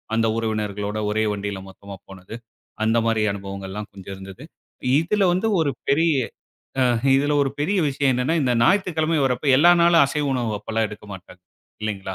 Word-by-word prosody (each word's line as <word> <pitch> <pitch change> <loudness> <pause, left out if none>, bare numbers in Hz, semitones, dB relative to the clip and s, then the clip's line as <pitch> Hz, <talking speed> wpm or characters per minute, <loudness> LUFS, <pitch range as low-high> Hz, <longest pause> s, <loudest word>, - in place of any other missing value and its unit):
அந்த 115 0 +2
உறவினர்களோட 105 -2 -3
ஒரே 110 +1 0
வண்டியில 100 -1 -4
மொத்தமா 100 +1 -11
போனது. 95 +3 -10 0.5
அந்த 115 +1 +2
மாரி 115 -1 +1
அனுபவங்கள்லாம் 100 +1 -7
கொஞ்சம் 95 0 -9
இருந்தது. 95 +7 -11 0.6
இதில 195 +5 0
வந்து 200 +5 0
ஒரு 145 -3 +1 0.2
பெரிய 160 +3 +3 0.7
ஆ - - +4 0.3
இதில 145 +2 +2
ஒரு 135 - -1
பெரிய 195 +7 +1
விஷயம் 135 -1 +1
என்னன்னா, 125 +6 0
இந்த 125 -2 +1
ஞாயித்துக்கிழமை 165 -2 +2
இவரப் 125 -2 +1
போய் 140 -3 +4
எல்லா 175 +3 +7
நாளும் 170 -3 +6
அசைவு 150 +1 -2
உணவு 115 -5 -1
அப்பல்லாம் 110 +1 -1
எடுக்க 105 0 -11
மாட்டாங்க. 90 -1 -12 0.4
இல்லைங்களா? 95 -3 -4
115 Hz, 165 wpm, -22 LUFS, 100-145 Hz, 0.7 s, எல்லா